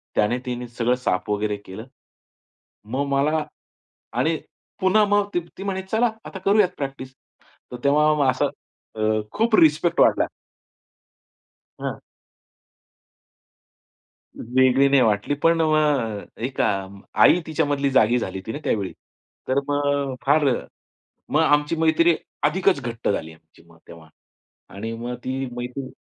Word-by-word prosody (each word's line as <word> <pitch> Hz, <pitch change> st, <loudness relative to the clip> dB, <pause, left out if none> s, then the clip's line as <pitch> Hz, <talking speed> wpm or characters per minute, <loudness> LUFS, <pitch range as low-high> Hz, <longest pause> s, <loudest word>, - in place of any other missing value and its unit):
त्याने 105 Hz, +4 st, +2 dB
तिने 125 Hz, -1 st, -4 dB
सगळं 120 Hz, +1 st, 0 dB
साफ 125 Hz, -8 st, -2 dB
वगैरे 105 Hz, 0 st, -1 dB
केलं. 100 Hz, +2 st, -10 dB, 1.0 s
मग 130 Hz, +6 st, -2 dB
मला 150 Hz, +3 st, +1 dB, 0.8 s
आणि 160 Hz, +1 st, +2 dB, 0.5 s
पुन्हा 200 Hz, +3 st, +4 dB
मग 205 Hz, 0 st, +2 dB
ती 175 Hz, +2 st, -4 dB
म्हणे, 190 Hz, -1 st, -2 dB
"चला 220 Hz, +5 st, +1 dB, 0.2 s
आता 190 Hz, -, -7 dB
करूयात 200 Hz, -1 st, +4 dB
प्रॅक्टिस." 135 Hz, -2 st, -6 dB, 0.6 s
तर 125 Hz, -, -6 dB
तेव्हा 150 Hz, -1 st, +3 dB
असा 130 Hz, -, 0 dB, 0.5 s
अ, 110 Hz, -, -5 dB, 0.3 s
खूप 225 Hz, +1 st, +2 dB
रिस्पेक्ट 160 Hz, 0 st, +3 dB
वाढला. -, -, +4 dB, 1.5 s
हां. -, -, -5 dB, 2.4 s
वेगळी 130 Hz, +3 st, +3 dB
नाही 140 Hz, -1 st, +5 dB
वाटली, 110 Hz, +3 st, +1 dB
पण 165 Hz, 0 st, +4 dB
मग 150 Hz, -9 st, +1 dB, 0.2 s
एक 130 Hz, 0 st, -2 dB
अ, 95 Hz, -1 st, 0 dB, 0.4 s
आई 180 Hz, -, +6 dB
तिच्यामधली 145 Hz, -3 st, 0 dB
जागी 125 Hz, -2 st, +4 dB
झाली 95 Hz, -, -4 dB
होती 95 Hz, +4 st, -6 dB
ना -, -, -4 dB
त्यावेळी. 100 Hz, -4 st, -1 dB, 0.6 s
तर 130 Hz, +2 st, +2 dB
मग 145 Hz, -1 st, 0 dB
फार 145 Hz, +2 st, +4 dB, 0.9 s
मग 155 Hz, -, +3 dB
आमची 150 Hz, 0 st, +2 dB
मैत्री 160 Hz, +1 st, +3 dB, 0.3 s
अधिकच 180 Hz, 0 st, +2 dB
घट्ट 120 Hz, -2 st, -3 dB
झाली 80 Hz, -5 st, -2 dB
आमची 80 Hz, 0 st, -22 dB
मग 85 Hz, -1 st, -20 dB
तेव्हा 80 Hz, -1 st, -13 dB, 0.7 s
आणि 115 Hz, +3 st, -5 dB
मग 120 Hz, +2 st, -5 dB
ती 130 Hz, +1 st, -3 dB
मैत्रीण 125 Hz, +2 st, -5 dB
140 Hz, 125 wpm, -23 LUFS, 115-160 Hz, 2.4 s, आई